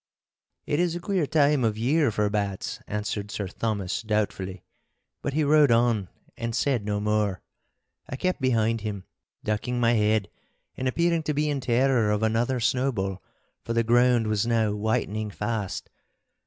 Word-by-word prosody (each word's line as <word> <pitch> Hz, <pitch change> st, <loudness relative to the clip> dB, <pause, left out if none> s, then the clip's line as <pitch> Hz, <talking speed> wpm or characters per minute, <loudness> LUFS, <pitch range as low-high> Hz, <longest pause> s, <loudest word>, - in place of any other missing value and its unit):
'It 145 Hz, -, 0 dB
is 175 Hz, -1 st, +1 dB
a -, -, -3 dB
queer 180 Hz, -4 st, 0 dB
time 145 Hz, -3 st, +3 dB
of 110 Hz, -2 st, +1 dB
year 140 Hz, +5 st, +2 dB
for 105 Hz, -1 st, 0 dB
bats,' 100 Hz, -2 st, -2 dB
answered 105 Hz, 0 st, -3 dB
Sir 100 Hz, -1 st, -3 dB
Thomas, 105 Hz, 0 st, -2 dB
doubtfully. 100 Hz, -4 st, -2 dB, 0.6 s
But 140 Hz, -, -3 dB
he 155 Hz, -, +2 dB
rode 150 Hz, -1 st, +5 dB
on 115 Hz, -4 st, +2 dB, 0.3 s
and 115 Hz, -1 st, -3 dB
said 125 Hz, -3 st, +1 dB
no 105 Hz, 0 st, -1 dB
more. 105 Hz, -3 st, 0 dB, 0.7 s
I -, -, -4 dB
kept 185 Hz, +3 st, -1 dB
behind 115 Hz, -3 st, +1 dB
him, 100 Hz, -3 st, -4 dB, 0.4 s
ducking 110 Hz, +4 st, -1 dB
my 120 Hz, 0 st, +3 dB
head 105 Hz, -2 st, +2 dB, 0.5 s
and 130 Hz, -, -2 dB
appearing 170 Hz, +5 st, +1 dB
to 150 Hz, -1 st, -2 dB
be 150 Hz, +1 st, +1 dB
in 140 Hz, -, -1 dB
terror 125 Hz, -2 st, +2 dB
of 105 Hz, +1 st, 0 dB
another 115 Hz, +3 st, +1 dB
snowball, 115 Hz, -7 st, 0 dB, 0.4 s
for 115 Hz, -, -3 dB
the 115 Hz, 0 st, +2 dB
ground 120 Hz, 0 st, +4 dB
was 110 Hz, +1 st, 0 dB
now 115 Hz, -3 st, +2 dB
whitening 110 Hz, 0 st, -1 dB
fast. 105 Hz, -2 st, -3 dB
115 Hz, 160 wpm, -26 LUFS, 105-130 Hz, 0.7 s, rode